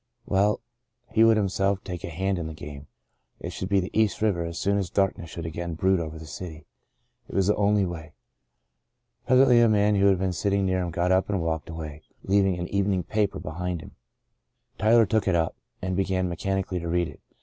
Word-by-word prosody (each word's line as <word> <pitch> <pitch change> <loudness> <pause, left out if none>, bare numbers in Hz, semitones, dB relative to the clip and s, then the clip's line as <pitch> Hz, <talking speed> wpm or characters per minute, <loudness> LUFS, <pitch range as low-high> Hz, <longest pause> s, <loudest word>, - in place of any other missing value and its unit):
Well, 100 +2 +2 0.5
he 110 - +4
would 115 -1 +6
himself 100 -1 0
take 90 -2 -6
a - - -4
hand 95 +3 -1
in 80 - -3
the 80 - -7
game. 70 -1 -9 0.5
It - - -5
should 95 - -5
be 100 -1 +3
the 90 - -3
East 110 -2 +2
River 100 -6 +1
as 85 0 -5
soon 100 +1 +1
as 95 -3 -2
darkness 95 -4 0
should 85 0 -6
again 85 +1 -4
brood 95 +2 +2
over 80 -1 -5
the 80 - -9
city. 80 -1 -8 0.6
It - - -8
was 95 - +3
the 105 - +3
only 105 -1 +2
way. 80 -3 -7 1.1
Presently 130 -1 +6
a 115 - +5
man 105 0 +3
who 100 0 +4
had 95 -1 +4
been 95 0 -1
sitting 100 +3 0
near 95 0 +1
him 90 - -2
got 85 +2 0
up 95 +2 +2
and 100 -2 0
walked 80 -1 -2
away, 80 -2 -7 0.2
leaving 95 -2 +2
an 90 0 -3
evening 100 -2 +1
paper 105 +2 0
behind 90 +2 -4
him. - - -11 0.9
Tyler 115 +2 +5
took 110 0 0
it 95 - +3
up 80 -1 0 0.3
and 95 0 -1
began 95 -1 0
mechanically 95 +1 -2
to 85 - -5
read 85 0 +1
it. - - -12
95 Hz, 210 wpm, -26 LUFS, 85-100 Hz, 1.1 s, would